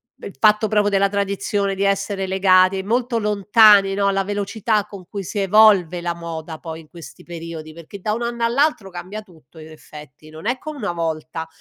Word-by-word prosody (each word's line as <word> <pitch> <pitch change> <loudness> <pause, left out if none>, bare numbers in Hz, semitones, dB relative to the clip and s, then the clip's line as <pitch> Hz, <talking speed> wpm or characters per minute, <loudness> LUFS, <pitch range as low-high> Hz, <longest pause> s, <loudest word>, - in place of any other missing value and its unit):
beh, - - -10
il 200 - -12
fatto 215 0 +4
proprio 205 -1 +1
della 200 0 +2
tradizione 200 0 -1
di 195 - -2
essere 195 0 -1
legati 190 0 +3
molto 235 +3 -1
lontani 205 -1 +5
no, 200 0 0
alla 195 0 +1
velocità 205 +1 -1
con 200 -4 -12
cui 200 -1 -6
si 205 +3 -5
evolve 195 -3 +4
la 170 0 -2
moda 165 -1 -7
poi 165 -1 -8
in 155 - -20
questi 170 -1 -13
periodi 165 -2 -8
perché 170 +5 -11
da 210 +3 -2
un 230 - -4
anno 235 0 -3
all'altro 240 -3 +1
cambia 185 +4 -7
tutto 165 -6 -21
in 155 0 -11
effetti, 150 -1 -14
non 155 +4 -12
è 250 +2 0
come 310 -1 -8
una 210 -9 -3
volta, 160 -1 -4
195 Hz, 195 wpm, -20 LUFS, 170-210 Hz, -, lontani